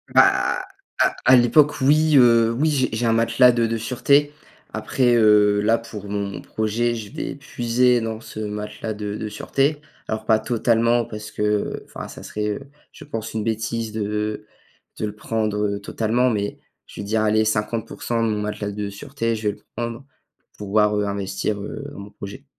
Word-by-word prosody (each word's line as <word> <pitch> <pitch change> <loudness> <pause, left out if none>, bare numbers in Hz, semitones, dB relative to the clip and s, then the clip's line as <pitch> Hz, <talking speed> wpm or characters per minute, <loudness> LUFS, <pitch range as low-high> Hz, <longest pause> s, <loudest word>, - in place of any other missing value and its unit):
Bah, 375 +1 +4 0.4
à - - +3
à 130 - +8
l'époque 145 +5 +4
oui. 155 +2 +4
Heu, 115 -2 +6
oui, 150 +6 +1
j'ai 130 -3 +1
j'ai 115 +2 -1
un 115 - +3
matelas 115 +2 +5
de 120 -1 +1
de 115 0 -1
sûreté. 140 +6 +2 0.4
Après, 125 -2 +1
heu, 105 -2 +5
là, 115 +2 +3
pour 105 -3 -9
mon 100 -1 -3
projet, 115 +2 -1
je 105 -3 -7
vais 140 - -4
puiser 125 -3 +1
dans 110 -1 -3
ce 110 - -9
matelas 105 +1 -4
de 105 0 -5
de 110 0 -4
sûreté. 140 +7 0 0.3
Alors 110 0 -3
pas 110 -1 +4
totalement 115 +1 +2
parce 105 -2 -8
que, - - -6
heu, 105 -1 0
enfin, - - -8
ça - - -11
serait, 105 0 -3
heu, 135 +7 -5 0.2
je - - -13
pense 110 -6 -5
une 110 -1 -2
bêtise 110 0 -2
de 105 0 -3 0.5
de 110 - -2
le 105 0 -5
prendre, 110 -1 -2
heu, 100 0 -1
totalement. 115 +5 0
Mais 100 -1 -2 0.3
je - - -8
veux - - -6
dire, 110 +1 +1
allez, 110 0 +3
50% 115 +2 -1
de 115 - +1
mon 105 -1 -1
matelas 105 -1 -3
de 100 0 -4
sûreté, 115 +1 -3
je 105 -1 -1
vais 105 - -3
le - - -23
prendre, 120 +3 -4 0.5
pouvoir, 105 +1 +2
heu, 105 - +1
investir, 100 +1 -2
heu, 140 +7 -6
dans - - -10
mon 100 +1 -10
projet. 115 +8 -9
110 Hz, 190 wpm, -22 LUFS, 105-120 Hz, 0.5 s, à